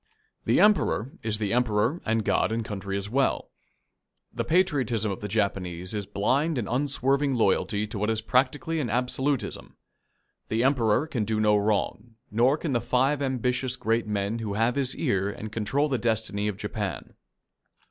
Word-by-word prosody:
The -, -, +3 dB
Emperor 195 Hz, -, +3 dB
is 110 Hz, -1 st, -1 dB
the 105 Hz, -1 st, -1 dB
Emperor, 120 Hz, +5 st, +1 dB
and 110 Hz, -1 st, +1 dB
God -, -, +2 dB
and 115 Hz, 0 st, -2 dB
country 100 Hz, -2 st, -4 dB
as 100 Hz, 0 st, -3 dB
well. 135 Hz, +5 st, 0 dB, 0.8 s
The -, -, -2 dB
patriotism 135 Hz, -, +1 dB
of 95 Hz, -, -5 dB
the 105 Hz, -, -5 dB
Japanese 95 Hz, -4 st, -2 dB
is 105 Hz, -2 st, -3 dB
blind 135 Hz, +10 st, +1 dB
and 115 Hz, -5 st, -2 dB
unswerving 135 Hz, +1 st, +1 dB
loyalty 105 Hz, -1 st, +1 dB
to 105 Hz, -1 st, -6 dB
what 105 Hz, +2 st, 0 dB
is 110 Hz, -1 st, 0 dB
practically 135 Hz, +7 st, +1 dB
an 130 Hz, -6 st, -2 dB
absolutism. 125 Hz, 0 st, -1 dB, 0.7 s
The 115 Hz, +2 st, 0 dB
Emperor 130 Hz, -1 st, +2 dB
can 125 Hz, -8 st, -2 dB
do 110 Hz, +1 st, -1 dB
no 105 Hz, -1 st, +4 dB
wrong, 105 Hz, +2 st, -1 dB, 0.2 s
nor 125 Hz, +7 st, +3 dB
can 155 Hz, -3 st, -3 dB
the 120 Hz, -, +1 dB
five 130 Hz, +4 st, +1 dB
ambitious 130 Hz, -1 st, 0 dB
great 115 Hz, -2 st, 0 dB
men 105 Hz, +2 st, -1 dB
who 105 Hz, -3 st, -3 dB
have 115 Hz, +3 st, +2 dB
his 135 Hz, -1 st, -1 dB
ear 100 Hz, -, 0 dB
and 110 Hz, +1 st, -7 dB
control 115 Hz, +7 st, 0 dB
the 130 Hz, -4 st, -1 dB
destiny 110 Hz, -2 st, -1 dB
of 105 Hz, -2 st, -3 dB
Japan. 105 Hz, -, -4 dB
115 Hz, 170 wpm, -26 LUFS, 105-130 Hz, 0.8 s, no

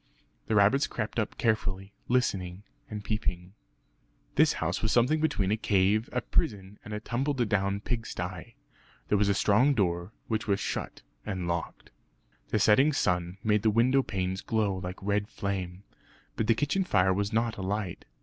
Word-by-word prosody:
The 110 Hz, -, +1 dB
rabbits 105 Hz, +8 st, +4 dB
crept 110 Hz, +1 st, -3 dB
up 110 Hz, -, -2 dB
carefully, 95 Hz, -3 st, -1 dB
listening 100 Hz, -7 st, 0 dB, 0.3 s
and 105 Hz, -1 st, -6 dB
peeping. 95 Hz, -4 st, -3 dB, 0.8 s
This -, -, +4 dB
house -, -, -2 dB
was 110 Hz, -, 0 dB
something 135 Hz, +6 st, +3 dB
between 105 Hz, -11 st, +1 dB
a 110 Hz, -, +2 dB
cave, 105 Hz, +1 st, +2 dB
a 125 Hz, -, -1 dB
prison, 100 Hz, -3 st, -1 dB
and 105 Hz, -, -9 dB
a 105 Hz, -, -3 dB
tumbledown 110 Hz, -6 st, 0 dB
pig 115 Hz, 0 st, -3 dB
stye. 90 Hz, -1 st, -6 dB, 0.5 s
There 105 Hz, -, +3 dB
was 100 Hz, -1 st, +3 dB
a 100 Hz, -, +3 dB
strong 120 Hz, +9 st, +4 dB
door, 85 Hz, -2 st, 0 dB, 0.2 s
which 110 Hz, -1 st, -2 dB
was 100 Hz, -1 st, +2 dB
shut -, -, -4 dB, 0.2 s
and 95 Hz, -4 st, -3 dB
locked. 85 Hz, -1 st, -4 dB, 0.6 s
The -, -, 0 dB
setting 130 Hz, +9 st, +5 dB
sun 90 Hz, -5 st, 0 dB
made 105 Hz, -1 st, +2 dB
the 110 Hz, -, +3 dB
window 125 Hz, +5 st, +4 dB
panes 95 Hz, -5 st, -3 dB
glow 105 Hz, -3 st, 0 dB
like 90 Hz, 0 st, -5 dB
red 100 Hz, +1 st, 0 dB
flame; 95 Hz, -2 st, -4 dB, 0.5 s
but 110 Hz, -, -1 dB
the 115 Hz, -, +4 dB
kitchen 145 Hz, -, +1 dB
fire 95 Hz, -, +3 dB
was 100 Hz, +2 st, -1 dB
not 115 Hz, 0 st, 0 dB
alight. 95 Hz, -1 st, -3 dB
105 Hz, 165 wpm, -29 LUFS, 95-115 Hz, 0.8 s, setting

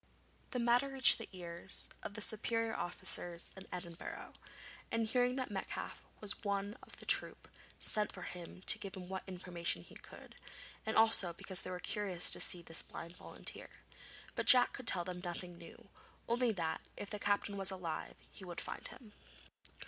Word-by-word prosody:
The -, -, -3 dB
matter 245 Hz, +3 st, +3 dB
reached 270 Hz, -3 st, +8 dB
the 225 Hz, -, -7 dB
ears 175 Hz, 0 st, -1 dB
of 205 Hz, -, -7 dB
the 215 Hz, -, -3 dB
superior 225 Hz, +1 st, +3 dB
officers 175 Hz, 0 st, -2 dB
in 190 Hz, 0 st, -11 dB
Edinburgh, 175 Hz, -2 st, -7 dB, 0.6 s
and, 230 Hz, 0 st, +1 dB
hearing 245 Hz, +2 st, +1 dB
that 255 Hz, -4 st, -3 dB
Metcalfe 195 Hz, -1 st, -5 dB, 0.2 s
was 210 Hz, +1 st, -4 dB
one 200 Hz, 0 st, -2 dB
of -, -, -11 dB
the -, -, -11 dB
troop, -, -, +2 dB, 0.3 s
sent 210 Hz, -1 st, +2 dB
for -, -, -9 dB
him 180 Hz, +1 st, -8 dB
to -, -, +8 dB
give 195 Hz, -, -7 dB
them 180 Hz, -2 st, -8 dB
what 190 Hz, 0 st, -4 dB
information 180 Hz, -2 st, -4 dB
he -, -, -16 dB
could, -, -, -12 dB, 0.5 s
and 220 Hz, -, 0 dB
also 220 Hz, -6 st, +4 dB
because 190 Hz, +2 st, +1 dB
they -, -, -7 dB
were 180 Hz, -1 st, -5 dB
curious 185 Hz, -2 st, +2 dB
to -, -, +6 dB
see 175 Hz, -1 st, +3 dB
this 165 Hz, 0 st, -1 dB
blind 170 Hz, +1 st, -9 dB
volunteer. -, -, -7 dB, 0.6 s
But -, -, -3 dB
Jack 250 Hz, -1 st, +9 dB
could 255 Hz, -2 st, -8 dB
tell 175 Hz, -6 st, +4 dB
them 180 Hz, 0 st, -6 dB
nothing 175 Hz, 0 st, -6 dB
new; 170 Hz, -, -13 dB, 0.4 s
only 240 Hz, 0 st, +2 dB
that, 165 Hz, -6 st, -2 dB, 0.2 s
if 205 Hz, -, -7 dB
the 210 Hz, -, -4 dB
captain 205 Hz, 0 st, 0 dB
was 195 Hz, -1 st, 0 dB
alive, 180 Hz, -4 st, -5 dB, 0.2 s
he -, -, -12 dB
would 175 Hz, -2 st, -6 dB
find -, -, -5 dB
him. 230 Hz, -5 st, -14 dB
195 Hz, 180 wpm, -35 LUFS, 175-225 Hz, 0.6 s, Jack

